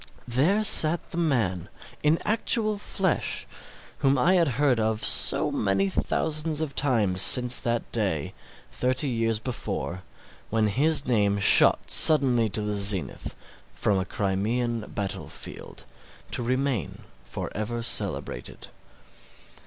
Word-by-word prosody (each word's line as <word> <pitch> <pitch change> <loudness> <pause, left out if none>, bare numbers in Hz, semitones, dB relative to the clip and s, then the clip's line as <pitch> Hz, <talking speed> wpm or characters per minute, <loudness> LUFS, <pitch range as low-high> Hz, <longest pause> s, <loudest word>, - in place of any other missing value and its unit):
There 155 - +1
sat 165 -4 +5
the - - -7
man, 110 - -1 0.3
in 150 +2 +2
actual 215 -1 -1
flesh, 190 -3 -3 0.5
whom 135 0 +1
I 175 +9 +2
had 175 -3 +2
heard 135 -5 +1
of 110 0 -2
so - - +5
many 95 -1 -1
thousands 155 - -3
of 155 -3 -4
times 110 -11 +1
since 125 +5 +6
that 120 -2 -3
day, 95 -10 -2 0.4
thirty 130 +3 -1
years 115 -3 -1
before, 105 -6 -6 0.5
when 110 -1 0
his 145 +6 0
name 105 -5 0
shot 100 - +4
suddenly 125 -7 +5
to 105 +2 -3
the 105 0 -3
zenith 100 -8 -2 0.4
from 100 -2 0
a 95 - -3
Crimean 110 +4 -3
battle 100 -1 -5
field, - - -10 0.5
to - - -4
remain 130 0 -3 0.2
for - - -8
ever 115 +3 -4
celebrated. - - -4
120 Hz, 125 wpm, -25 LUFS, 105-145 Hz, 0.5 s, since